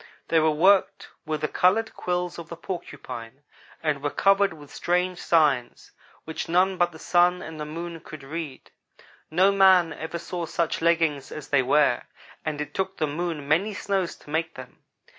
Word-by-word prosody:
They 165 - +4
were 160 0 +3
worked 185 +6 +3 0.2
with 155 -1 -2
the 155 - +1
colored 215 +8 +2
quills 180 -1 -2
of 170 0 -9
the 170 - -6
Porcupine 145 - -7 0.4
and 150 -3 0
were 145 - 0
covered 195 +4 +3
with 150 -3 -13
strange 180 +1 0
signs, 145 -7 +1 0.3
which 160 +1 -5
none 185 +2 +3
but 175 0 +3
the 160 - -12
Sun 180 +2 +2
and 160 -1 -8
the 150 - -4
Moon 165 +2 -6
could 155 -2 -11
read. 150 -1 -7 0.6
No 185 +5 +4
man 190 -4 +5
ever 160 +3 -5
saw 170 0 -5
such 165 0 -1
leggings 165 -5 +1
as 150 -2 -8
they 140 -2 +4
were, 135 -1 +3 0.4
and 155 -2 -3
it 150 0 -5
took 190 0 -2
the 155 - +1
Moon 155 -1 -3
many 190 +8 +1
snows 195 -3 -1
to 145 - -15
make 160 +1 -1
them. 130 -1 -11
165 Hz, 180 wpm, -25 LUFS, 150-180 Hz, 0.6 s, man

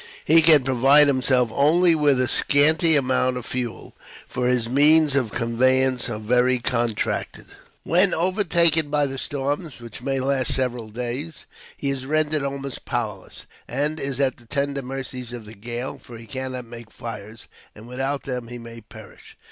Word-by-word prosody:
He 165 +1 +5
can 155 -4 +6
provide 135 +3 +5
himself 130 -3 +2
only 165 +6 +4
with 145 -4 +2
a 130 - +1
scanty 155 +5 +4
amount 130 -2 +1
of 125 - -7
fuel, 125 -2 -5 0.3
for 125 0 -2
his 125 -2 +1
means 145 +3 +4
of 125 -6 0
conveyance 130 +2 +1
are 110 - -4
very 125 +4 +1
contracted. 120 -3 -2 0.4
When 180 +4 +2
overtaken 170 -4 +2
by 145 0 +1
the 135 -1 -5
storms, 145 +3 -4
which 120 -1 -11
may 135 +1 -2
last 130 -1 0
several 125 -3 -2
days, 125 +8 -6 0.3
he 140 - -2
is 130 -1 -5
rendered 155 0 +1
almost 140 -1 -5
powerless, 105 -5 -5 0.2
and 145 +5 -2
is 135 -1 -3
at 135 -2 +1
the 120 -2 -20
tender 140 +2 -2
mercies 130 -2 -6
of 120 -3 -8
the 105 - -11
gale; 120 +4 -6
for 120 - -12
he 115 - -12
cannot 130 0 -6
make 115 -1 -11
fires, 110 -2 -9 0.3
and 110 +2 -13
without 135 +3 -3
them 125 -3 -5
he 120 +1 -8
may 115 -1 -11
perish. 110 0 -15
130 Hz, 165 wpm, -22 LUFS, 120-145 Hz, 0.4 s, can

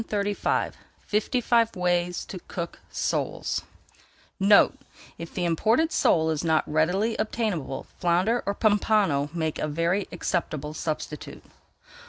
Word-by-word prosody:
[Page 225 - -9
379] 205 -1 0 0.3
FIFTY 220 +4 0
FIVE 230 -1 +2
WAYS 180 -1 0
TO 185 - -7
COOK 170 -1 -5
SOLES - - -1 0.8
NOTE: 205 +7 +5 0.4
If 165 0 -7
the 180 - 0
imported 225 - +2
sole 160 - +3
is 155 0 -2
not 160 -2 +3
readily 180 +9 +1
obtainable, 210 - -2
flounder 185 +7 +2
or 200 - 0
pompano 205 -9 +2
makes 160 -2 -2
a - - 0
very 170 +6 0
acceptable 155 -4 -2
substitute. 155 -1 -5
180 Hz, 125 wpm, -26 LUFS, 160-210 Hz, 0.8 s, NOTE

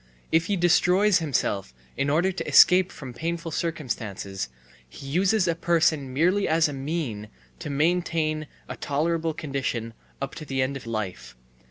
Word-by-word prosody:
If 165 +1 +3
he 200 - 0
destroys 180 +3 +4
himself 105 - -1 0.2
in 140 - 0
order 170 +6 +2
to 190 - -5
escape 185 0 +6
from 130 -4 -9
painful 165 +5 -4
circumstances, 110 - -4 0.4
he 135 - -11
uses 185 +7 +2
a 170 - +2
person 160 -5 +1
merely 180 +9 +2
as 160 +1 +3
a 145 - -5
mean 135 -7 -4 0.3
to 165 -2 -6
maintain 155 0 0 0.2
a - - -6
tolerable 160 +2 -1
condition 135 -7 -3 0.3
up 135 - -4
to - - -5
the 135 -2 -3
end 135 +2 -2
of 130 -4 -8
life. 95 - -5
155 Hz, 155 wpm, -25 LUFS, 130-170 Hz, 0.4 s, escape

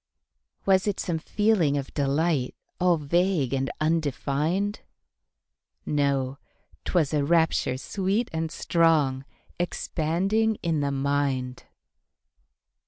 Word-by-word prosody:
Was 190 +1 +3
it 205 - -1
some 165 -2 -1
feeling 190 -7 +2
of 135 -1 -5
delight, 145 -1 0 0.2
All 180 -1 +3
vague 160 -2 +1
and 135 0 0
undefined? 160 - 0 1.1
No; 140 -2 0 0.5
'twas 160 -5 +1
a 145 -2 +2
rapture 160 -4 +2
sweet 200 - -1
and 160 0 -2
strong, 155 -7 +2 0.3
Expanding 190 +6 0
in 165 -3 +1
the 140 -1 0
mind. 135 -2 -1
160 Hz, 100 wpm, -26 LUFS, 140-180 Hz, 1.1 s, Was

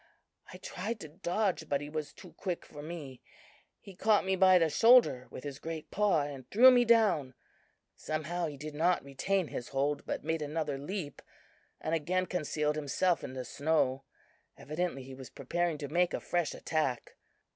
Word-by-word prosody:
I 185 - -9
tried 200 +4 -5
to 155 - -7
dodge, 180 +1 -1
but 140 - +1
he 145 - -7
was 155 0 -4
too - - -14
quick 180 -3 -4
for 145 - -10
me. 150 -5 -8 0.6
He 195 - -12
caught 210 +1 +3
me 190 0 +1
by 185 0 +6
the 165 -2 +3
shoulder 225 - +5
with - - -9
his 140 -1 -6
great 160 -1 -6
paw, 200 -7 +2
and 140 -3 -7
threw 255 +5 +8
me 245 -1 +5
down. 205 - +3 0.6
Somehow, 160 +3 -3
he 145 -2 -7
did 150 +2 -7
not 170 +4 +2
retain 165 +6 -1
his 120 - -5
hold, 145 +1 0
but - - -3
made 160 +1 -1
another 150 -2 -2
leap 150 -1 -5 0.6
and 160 - -3
again 180 +4 0
concealed 150 -4 -1
himself 165 +4 +1
in - - -6
the 130 -1 -5
snow. 135 -1 0 0.5
Evidently 155 -2 -3
he 130 +1 -10
was 130 -1 -10
preparing 175 -2 -2
to 145 -1 -5
make 175 +4 +1
a - - -3
fresh 175 -4 -1
attack. 150 -6 -2
155 Hz, 180 wpm, -31 LUFS, 145-185 Hz, 0.6 s, threw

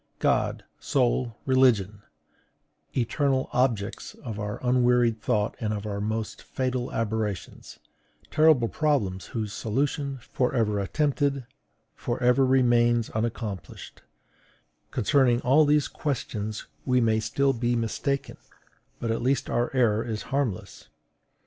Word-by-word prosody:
God, - - +1 0.2
soul, 125 -2 0
religion, 115 -7 +3 1.0
eternal 130 +2 0
objects 115 -4 -1
of 110 -4 -7
our 105 0 -4
unwearied 125 -2 +3
thought 105 0 0
and 110 -2 -2
our 105 -1 -3
most 110 +1 -3
fatal 130 -1 -3
aberrations, 110 -3 -3 0.5
terrible 155 -6 +4
problems 110 -12 0
whose 110 -3 -4
solution, 140 +4 -1
for 125 +1 -2
ever 105 -4 +1
attempted, 140 +4 0 0.5
for 120 0 -4
ever 125 +2 +4
remains 120 -3 +3
unaccomplished, 110 -3 -5 0.9
concerning 125 0 +2
all 140 +4 +5
these 150 0 +3
questions 110 -7 -4 0.2
we 125 -1 +2
may 110 -2 +2
still 135 +5 +1
be 120 0 0
mistaken, 120 +4 -2 0.6
but 115 - -2
at 115 - -1
least 130 +1 0
our 120 +1 +1
error 115 -3 +3
is 110 -3 -4
harmless. 135 -9 -3
120 Hz, 115 wpm, -26 LUFS, 110-130 Hz, 1.0 s, all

